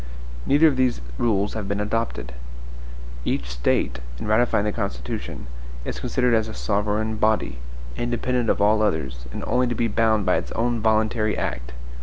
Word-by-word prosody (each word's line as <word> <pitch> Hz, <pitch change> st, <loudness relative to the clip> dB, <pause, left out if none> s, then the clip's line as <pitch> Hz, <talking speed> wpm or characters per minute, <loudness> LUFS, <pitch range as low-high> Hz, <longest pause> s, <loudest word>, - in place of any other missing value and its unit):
Neither 145 Hz, +3 st, +5 dB
of 140 Hz, -4 st, +2 dB
these 130 Hz, -2 st, +2 dB, 0.2 s
rules 105 Hz, -3 st, +1 dB
have 110 Hz, -3 st, -4 dB
been 100 Hz, +1 st, -1 dB
adopted. 105 Hz, -, -2 dB, 0.9 s
Each 60 Hz, -, -1 dB
State, 60 Hz, +1 st, +1 dB, 0.2 s
in -, -, -5 dB
ratifying 110 Hz, -1 st, +3 dB
the 105 Hz, -, +1 dB
Constitution, 65 Hz, -, -4 dB, 0.4 s
is -, -, -4 dB
considered 125 Hz, -1 st, +1 dB
as 110 Hz, -1 st, +3 dB
a 110 Hz, -, -7 dB
sovereign 105 Hz, +1 st, 0 dB
body, 110 Hz, -, +1 dB, 0.4 s
independent 120 Hz, -, 0 dB
of -, -, +2 dB
all 105 Hz, +1 st, +4 dB
others, 65 Hz, -, -1 dB
and -, -, -5 dB
only 125 Hz, 0 st, +2 dB
to 120 Hz, -, -1 dB
be 115 Hz, -, +1 dB
bound 110 Hz, -2 st, +2 dB
by -, -, +3 dB
its -, -, -4 dB
own 120 Hz, +1 st, 0 dB
voluntary 110 Hz, 0 st, +2 dB
act. 60 Hz, 0 st, -3 dB
110 Hz, 165 wpm, -24 LUFS, 100-115 Hz, 0.9 s, Neither